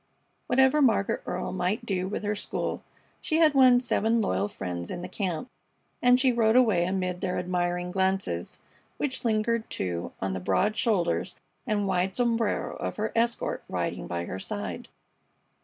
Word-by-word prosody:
Whatever 265 Hz, +4 st, +4 dB
Margaret 225 Hz, -7 st, +2 dB
Earle 180 Hz, -, -3 dB
might 190 Hz, +5 st, -1 dB
do 185 Hz, -4 st, -1 dB
with 205 Hz, -, -4 dB
her 205 Hz, 0 st, 0 dB
school, 205 Hz, -, -3 dB, 0.4 s
she 315 Hz, -, 0 dB
had 315 Hz, -3 st, +5 dB
won 255 Hz, -3 st, +6 dB
seven 230 Hz, -2 st, +1 dB
loyal 95 Hz, -, 0 dB
friends 90 Hz, -4 st, -5 dB
in 175 Hz, -, -5 dB
the -, -, -4 dB
camp, 185 Hz, -1 st, -3 dB, 0.5 s
and 250 Hz, 0 st, +5 dB
she 260 Hz, -1 st, +4 dB
rode 230 Hz, -1 st, +3 dB
away 220 Hz, -9 st, +4 dB
amid 180 Hz, -1 st, -2 dB
their 180 Hz, -1 st, -1 dB
admiring 180 Hz, 0 st, -1 dB
glances, 190 Hz, -, -1 dB, 0.4 s
which 270 Hz, -3 st, -2 dB
lingered, 230 Hz, 0 st, 0 dB
too, 85 Hz, -2 st, -3 dB
on 95 Hz, -1 st, -2 dB
the 95 Hz, -, -3 dB
broad 205 Hz, -, +1 dB
shoulders 185 Hz, -7 st, 0 dB, 0.3 s
and 210 Hz, -3 st, +1 dB
wide 190 Hz, 0 st, 0 dB
sombrero 230 Hz, -3 st, 0 dB
of -, -, -4 dB
her 215 Hz, 0 st, -2 dB
escort 235 Hz, +1 st, 0 dB
riding -, -, -3 dB
by 85 Hz, 0 st, -3 dB
her 95 Hz, -, -5 dB
side. -, -, -5 dB
200 Hz, 160 wpm, -27 LUFS, 180-235 Hz, 0.5 s, won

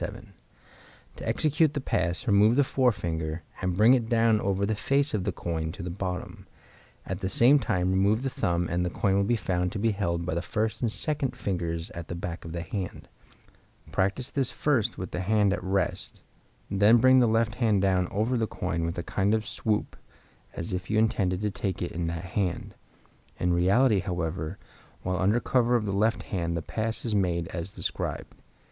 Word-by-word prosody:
7.) -, -, -7 dB, 0.8 s
To -, -, -7 dB
execute 155 Hz, 0 st, +2 dB
the -, -, 0 dB
pass, 90 Hz, -9 st, -1 dB
remove 105 Hz, +2 st, +5 dB
the 145 Hz, -, +5 dB
forefinger, 85 Hz, -, -1 dB, 0.2 s
and 90 Hz, -1 st, -1 dB
bring 110 Hz, +5 st, +7 dB
it 120 Hz, -3 st, +1 dB
down 115 Hz, -2 st, +3 dB
over 100 Hz, 0 st, 0 dB
the 110 Hz, -, 0 dB
face 140 Hz, +7 st, 0 dB
of 100 Hz, -4 st, -1 dB
the -, -, 0 dB
coin 80 Hz, -2 st, -3 dB
to -, -, -7 dB
the 90 Hz, -, -4 dB
bottom; 90 Hz, 0 st, -5 dB, 0.6 s
at 95 Hz, 0 st, -4 dB
the 95 Hz, -, -2 dB
same 125 Hz, +8 st, +5 dB
time 95 Hz, -8 st, 0 dB
remove 100 Hz, +5 st, +2 dB
the 135 Hz, -, 0 dB
thumb, 85 Hz, -4 st, 0 dB
and 85 Hz, +2 st, 0 dB
the 90 Hz, -, 0 dB
coin 95 Hz, +2 st, 0 dB
will 100 Hz, -, +3 dB
be 120 Hz, +4 st, +2 dB
found 90 Hz, -4 st, -1 dB
to -, -, -3 dB
be 115 Hz, +2 st, +1 dB
held 85 Hz, -4 st, -1 dB
by 90 Hz, -, -2 dB
the 85 Hz, -, -1 dB
first 110 Hz, +3 st, -2 dB
and 115 Hz, -3 st, +1 dB
second 140 Hz, -1 st, -1 dB
fingers 85 Hz, -7 st, -3 dB
at 85 Hz, -2 st, -7 dB
the 85 Hz, -, -5 dB
back 85 Hz, -1 st, -5 dB
of 80 Hz, -, -7 dB
the 85 Hz, 0 st, -4 dB
hand. 95 Hz, +1 st, -5 dB, 0.8 s
Practice 100 Hz, +8 st, -1 dB
this 135 Hz, -3 st, 0 dB
first 125 Hz, -6 st, 0 dB
with 90 Hz, -, -6 dB
the -, -, -3 dB
hand 100 Hz, +1 st, +2 dB
at 90 Hz, -, -4 dB
rest, 95 Hz, -1 st, -2 dB, 0.4 s
then 100 Hz, +4 st, +5 dB
bring 130 Hz, +2 st, +6 dB
the 120 Hz, -, +4 dB
left 115 Hz, 0 st, +2 dB
hand 105 Hz, -4 st, +3 dB
down 95 Hz, -2 st, +2 dB
over 115 Hz, +5 st, 0 dB
the 110 Hz, -1 st, 0 dB
coin 85 Hz, -4 st, -3 dB
with 85 Hz, 0 st, -3 dB
a 85 Hz, -, -2 dB
kind 100 Hz, +5 st, +1 dB
of 110 Hz, 0 st, -2 dB
swoop 105 Hz, -1 st, -1 dB, 0.6 s
as 85 Hz, +2 st, -4 dB
if 90 Hz, +1 st, -4 dB
you 105 Hz, -, +1 dB
intended 100 Hz, -4 st, +1 dB
to 105 Hz, -1 st, 0 dB
take 95 Hz, 0 st, -3 dB
it 85 Hz, -, -3 dB
in 85 Hz, 0 st, -3 dB
that 85 Hz, +1 st, -4 dB
hand. 95 Hz, -2 st, -2 dB, 0.7 s
In 90 Hz, 0 st, +1 dB
reality, 100 Hz, +6 st, +4 dB
however, 85 Hz, -1 st, -3 dB, 0.5 s
while 90 Hz, 0 st, -1 dB
under 105 Hz, +5 st, +3 dB
cover 125 Hz, -1 st, +2 dB
of 115 Hz, -3 st, +1 dB
the 100 Hz, -, -1 dB
left 105 Hz, +1 st, +1 dB
hand 85 Hz, -3 st, -2 dB
the 80 Hz, -, -4 dB
pass 110 Hz, +1 st, -2 dB
is 115 Hz, -, -1 dB
made 90 Hz, -4 st, +1 dB
as 85 Hz, +1 st, -5 dB
described. -, -, -3 dB
100 Hz, 205 wpm, -27 LUFS, 90-115 Hz, 0.8 s, bring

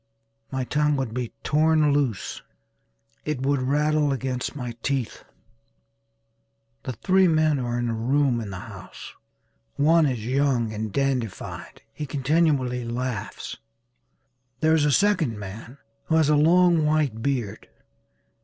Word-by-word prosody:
My 130 Hz, -1 st, -2 dB
tongue 150 Hz, +3 st, +1 dB
would 130 Hz, -5 st, -3 dB
be 125 Hz, -2 st, -3 dB
torn 155 Hz, -1 st, +3 dB
loose 135 Hz, -8 st, -1 dB, 0.8 s
it 145 Hz, -4 st, -3 dB
would 140 Hz, -1 st, +1 dB
rattle 150 Hz, +2 st, +1 dB
against 130 Hz, 0 st, -3 dB
my 125 Hz, -4 st, -4 dB
teeth. 135 Hz, -5 st, -2 dB, 1.6 s
The 130 Hz, -, -3 dB
three 190 Hz, -, +3 dB
men 155 Hz, -3 st, +2 dB
are 120 Hz, -1 st, -2 dB
in 120 Hz, 0 st, -1 dB
a 115 Hz, -, -1 dB
room 125 Hz, +2 st, +1 dB
in 105 Hz, -, -6 dB
the 95 Hz, -, -6 dB
house. -, -, -10 dB, 0.6 s
One 160 Hz, +2 st, +4 dB
is 120 Hz, -5 st, -3 dB
young 125 Hz, -3 st, +1 dB
and 110 Hz, 0 st, -4 dB
dandified. 130 Hz, -4 st, -3 dB
He 150 Hz, -, -6 dB
continually 135 Hz, -3 st, +1 dB
laughs. 120 Hz, -2 st, -4 dB, 1.0 s
There 160 Hz, +3 st, +3 dB
is 155 Hz, -2 st, +3 dB
a 150 Hz, -, +3 dB
second 170 Hz, -, +2 dB
man 105 Hz, +6 st, -9 dB, 0.3 s
who 160 Hz, -, +1 dB
has 160 Hz, -2 st, +3 dB
a 150 Hz, -, +4 dB
long 170 Hz, +2 st, +4 dB
white 150 Hz, -7 st, +1 dB
beard. 120 Hz, -6 st, -3 dB
135 Hz, 135 wpm, -24 LUFS, 120-150 Hz, 1.6 s, One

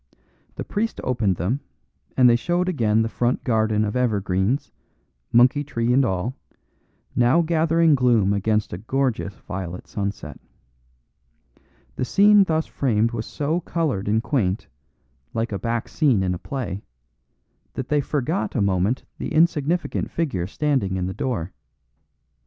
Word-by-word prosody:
The -, -, -4 dB
priest 225 Hz, +2 st, -2 dB
opened 115 Hz, -7 st, +1 dB
them, 95 Hz, -, -1 dB, 0.6 s
and 125 Hz, -1 st, +7 dB
they 120 Hz, -, +6 dB
showed 175 Hz, +7 st, 0 dB
again 110 Hz, -10 st, +2 dB
the -, -, -1 dB
front 120 Hz, +2 st, -1 dB
garden 110 Hz, -2 st, +1 dB
of 105 Hz, -, -3 dB
evergreens, 110 Hz, +2 st, 0 dB, 0.6 s
monkey 125 Hz, +5 st, +5 dB
tree 120 Hz, -4 st, -1 dB
and 135 Hz, +2 st, +4 dB
all, 110 Hz, +3 st, -1 dB, 0.8 s
now 125 Hz, +8 st, +4 dB
gathering 165 Hz, 0 st, +3 dB
gloom 120 Hz, -7 st, +3 dB
against 105 Hz, +1 st, 0 dB
a 85 Hz, -, -5 dB
gorgeous 120 Hz, -3 st, -1 dB
violet 90 Hz, -2 st, -6 dB
sunset. 100 Hz, -3 st, -5 dB, 1.6 s
The 130 Hz, -, 0 dB
scene 205 Hz, +5 st, +5 dB
thus 160 Hz, -2 st, 0 dB
framed 115 Hz, -4 st, 0 dB
was 115 Hz, -2 st, -4 dB
so 155 Hz, +4 st, -1 dB
coloured 155 Hz, -, -2 dB
and 110 Hz, +2 st, +1 dB
quaint, 110 Hz, -10 st, -1 dB, 0.7 s
like 115 Hz, 0 st, -1 dB
a 100 Hz, -, -3 dB
back 115 Hz, +3 st, -2 dB
scene 130 Hz, -11 st, +2 dB
in 90 Hz, -1 st, 0 dB
a 90 Hz, -, -5 dB
play, 110 Hz, -5 st, -4 dB, 0.9 s
that 130 Hz, -, -4 dB
they 150 Hz, -1 st, +2 dB
forgot 150 Hz, +6 st, -2 dB
a -, -, +1 dB
moment 100 Hz, +4 st, +1 dB, 0.2 s
the -, -, -4 dB
insignificant 165 Hz, +1 st, +1 dB
figure 115 Hz, -, -2 dB
standing 130 Hz, -6 st, 0 dB
in 90 Hz, -, -1 dB
the 95 Hz, -, -3 dB
door. 100 Hz, -10 st, -3 dB
120 Hz, 140 wpm, -23 LUFS, 100-145 Hz, 1.6 s, and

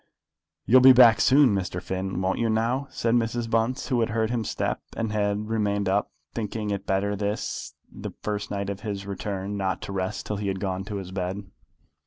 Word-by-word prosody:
"You'll 130 Hz, +2 st, +6 dB
be 130 Hz, 0 st, +9 dB
back 120 Hz, -3 st, +7 dB
soon, 135 Hz, -4 st, +5 dB
Mr. 95 Hz, -2 st, -2 dB
Finn, 95 Hz, 0 st, -3 dB
won't 95 Hz, +1 st, 0 dB
you 115 Hz, -1 st, +1 dB
now?" 120 Hz, +5 st, 0 dB
said 115 Hz, 0 st, -1 dB
Mrs. 120 Hz, 0 st, 0 dB
Bunce, 115 Hz, +5 st, 0 dB
who 125 Hz, -3 st, +2 dB
had 115 Hz, -, +1 dB
heard 110 Hz, +1 st, 0 dB
his 115 Hz, -3 st, -1 dB
step, -, -, -2 dB, 0.2 s
and 115 Hz, -1 st, -1 dB
had 105 Hz, 0 st, 0 dB
remained 100 Hz, -2 st, 0 dB
up, 100 Hz, +2 st, +1 dB, 0.2 s
thinking 105 Hz, -1 st, -3 dB
it 100 Hz, 0 st, -4 dB
better 100 Hz, +1 st, +1 dB
this, 105 Hz, +1 st, -3 dB
the -, -, -7 dB
first 105 Hz, -1 st, -3 dB
night 100 Hz, -1 st, -2 dB
of 100 Hz, -, -6 dB
his 100 Hz, -2 st, -5 dB
return, 100 Hz, 0 st, -4 dB
not 95 Hz, -1 st, -1 dB
to -, -, -6 dB
rest 95 Hz, +2 st, -3 dB
till 105 Hz, -, -3 dB
he 100 Hz, 0 st, -3 dB
had 95 Hz, -1 st, -2 dB
gone 95 Hz, -1 st, -2 dB
to 105 Hz, 0 st, -5 dB
his 95 Hz, -2 st, -5 dB
bed. 95 Hz, +1 st, -3 dB
105 Hz, 205 wpm, -26 LUFS, 100-115 Hz, 0.2 s, be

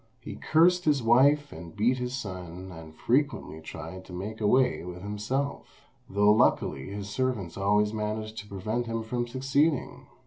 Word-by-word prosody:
He -, -, -8 dB
cursed 175 Hz, +3 st, +3 dB
his 145 Hz, -5 st, +2 dB
wife 140 Hz, +5 st, +4 dB
and 80 Hz, 0 st, -10 dB
beat 125 Hz, +5 st, +2 dB
his 125 Hz, +1 st, -3 dB
son, 90 Hz, -4 st, -7 dB
and 80 Hz, -2 st, -11 dB
frequently 125 Hz, -, 0 dB
tried 80 Hz, +3 st, -8 dB
to 90 Hz, -, -12 dB
make 105 Hz, +5 st, -6 dB
away 125 Hz, +2 st, +3 dB
with 90 Hz, +1 st, -8 dB
himself, 105 Hz, +8 st, -4 dB, 0.2 s
though 105 Hz, +1 st, +4 dB
luckily 70 Hz, -9 st, +2 dB
his 100 Hz, 0 st, -5 dB
servants 110 Hz, -7 st, -2 dB
always 105 Hz, +2 st, +2 dB
managed 110 Hz, 0 st, -3 dB
to 105 Hz, -, -9 dB
prevent 110 Hz, +5 st, -3 dB
him 115 Hz, 0 st, -2 dB
from 120 Hz, +2 st, -2 dB
succeeding. 135 Hz, +4 st, 0 dB
110 Hz, 160 wpm, -28 LUFS, 95-130 Hz, 0.2 s, wife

